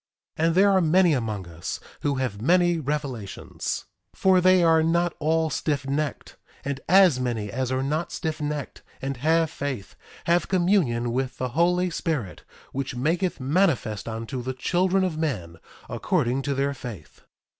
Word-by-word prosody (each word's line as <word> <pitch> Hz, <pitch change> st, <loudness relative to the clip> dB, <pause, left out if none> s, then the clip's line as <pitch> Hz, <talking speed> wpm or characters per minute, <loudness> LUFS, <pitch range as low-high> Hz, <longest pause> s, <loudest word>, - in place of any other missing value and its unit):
1:4 160 Hz, -, +3 dB
And 165 Hz, -, +1 dB
there 200 Hz, +2 st, +5 dB
are 190 Hz, -1 st, +4 dB
many 170 Hz, +1 st, +4 dB
among 110 Hz, -8 st, -2 dB
us 85 Hz, -1 st, -6 dB, 0.2 s
who 145 Hz, -1 st, 0 dB
have 125 Hz, -6 st, -3 dB
many 175 Hz, +4 st, +3 dB
revelations, 140 Hz, -8 st, -4 dB, 0.3 s
for 190 Hz, -1 st, +4 dB
they 185 Hz, 0 st, +5 dB
are 165 Hz, -1 st, +5 dB
not 170 Hz, +2 st, +1 dB
all 160 Hz, +1 st, +1 dB
stiffnecked. 145 Hz, 0 st, -2 dB, 0.3 s
And 140 Hz, -1 st, -3 dB
as 185 Hz, -7 st, +6 dB
many 115 Hz, -5 st, -2 dB
as 130 Hz, +2 st, -2 dB
are 130 Hz, 0 st, 0 dB
not 155 Hz, +5 st, -1 dB
stiffnecked 150 Hz, -3 st, -4 dB, 0.2 s
and 135 Hz, -1 st, -4 dB
have 160 Hz, +4 st, +2 dB
faith, 130 Hz, -8 st, -5 dB, 0.3 s
have 170 Hz, 0 st, +2 dB
communion 175 Hz, -, +2 dB
with 130 Hz, +1 st, -2 dB
the 130 Hz, -, -2 dB
Holy 175 Hz, +6 st, +2 dB
Spirit, 135 Hz, -, -3 dB, 0.3 s
which 135 Hz, -1 st, -4 dB
maketh 165 Hz, +7 st, 0 dB
manifest 130 Hz, -, +1 dB
unto 115 Hz, +3 st, -4 dB
the 130 Hz, +2 st, -3 dB
children 185 Hz, +8 st, +1 dB
of 170 Hz, -4 st, -2 dB
men, 95 Hz, -, -3 dB, 0.3 s
according 125 Hz, -, 0 dB
to 140 Hz, 0 st, -2 dB
their 140 Hz, +1 st, 0 dB
faith. 120 Hz, -7 st, -9 dB
145 Hz, 155 wpm, -25 LUFS, 125-170 Hz, 0.3 s, as